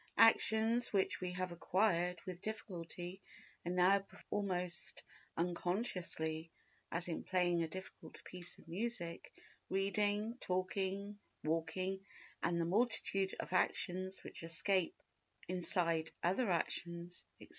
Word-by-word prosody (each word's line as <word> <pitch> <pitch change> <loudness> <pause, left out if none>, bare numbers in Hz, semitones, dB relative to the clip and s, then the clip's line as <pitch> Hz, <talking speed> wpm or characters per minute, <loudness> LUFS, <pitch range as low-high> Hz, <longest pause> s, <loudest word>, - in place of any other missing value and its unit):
Actions 225 +1 +6
which 195 -2 +2
we 180 -1 -1
have 185 0 -2
acquired 180 0 +2
with 180 -2 -5
difficulty 185 -3 -5 0.4
and 175 +1 -1
now 185 +2 +6
perform 200 +1 -4
almost 180 -1 -2 0.3
unconsciously—as 170 -2 -2
in 170 - -2
playing 175 -2 +2
a 165 - +1
difficult 185 +3 -8
piece 180 -1 -7
of - - -17
music, 175 -2 -3 0.4
reading, 205 +4 +1
talking, 195 +2 -1 0.2
walking 165 +5 0 0.4
and 170 0 +1
the 165 - +2
multitude 195 -1 +2
of - - -4
actions 185 +1 +1
which - - -5
escape 170 +2 +1
our - - -28
notice 185 - 0
inside 165 -3 +2
other 195 +6 +2
actions, 170 0 -1 0.2
etc. - - -13
185 Hz, 120 wpm, -38 LUFS, 170-195 Hz, 0.4 s, Actions